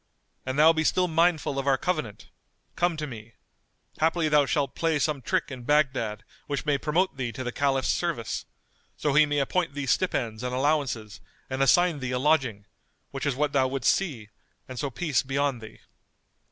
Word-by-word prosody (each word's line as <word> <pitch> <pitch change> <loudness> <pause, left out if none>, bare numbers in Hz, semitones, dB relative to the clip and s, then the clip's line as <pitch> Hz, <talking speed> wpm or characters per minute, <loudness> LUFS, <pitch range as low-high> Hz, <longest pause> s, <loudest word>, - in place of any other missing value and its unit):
An 130 - -2
thou 155 +3 +6
be 160 -1 0
still 180 +3 +2
mindful 165 -4 +1
of 135 - -4
our 135 -1 +4
covenant, 155 - -3 0.4
come 175 -2 +1
to 155 - -3
me; 115 -4 -10 0.7
haply 160 0 +2
thou 150 -2 +4
shalt 140 -3 0
play 165 -2 0
some 145 -1 -1
trick 125 - -1
in 130 -1 -7
Baghdad 130 -5 0 0.2
which 145 -1 -3
may 145 -2 +1
promote 165 +3 0
thee 125 -3 -2
to 130 +4 -6
the 125 - -3
Caliph's 135 0 0
service, 165 -10 -2 0.5
so 150 - 0
he 155 +1 +5
may 145 0 -1
appoint 145 +2 0
thee 145 -1 -3
stipends 120 -8 0
and 125 0 -3
allowances 130 -7 -1 0.3
and 130 +1 -2
assign 170 +3 +4
thee 130 -2 -4
a - - +1
lodging, 130 -7 +1 0.5
which 135 +1 -3
is 140 - 0
what 145 +1 0
thou 130 -1 +3
wouldst 130 -1 +2
see 130 - -4 0.4
and 130 -2 -7
so 140 - -2
peace 145 0 0
be 135 0 -4
on 140 -3 +1
thee." 110 -1 -12
140 Hz, 190 wpm, -26 LUFS, 130-155 Hz, 0.7 s, thou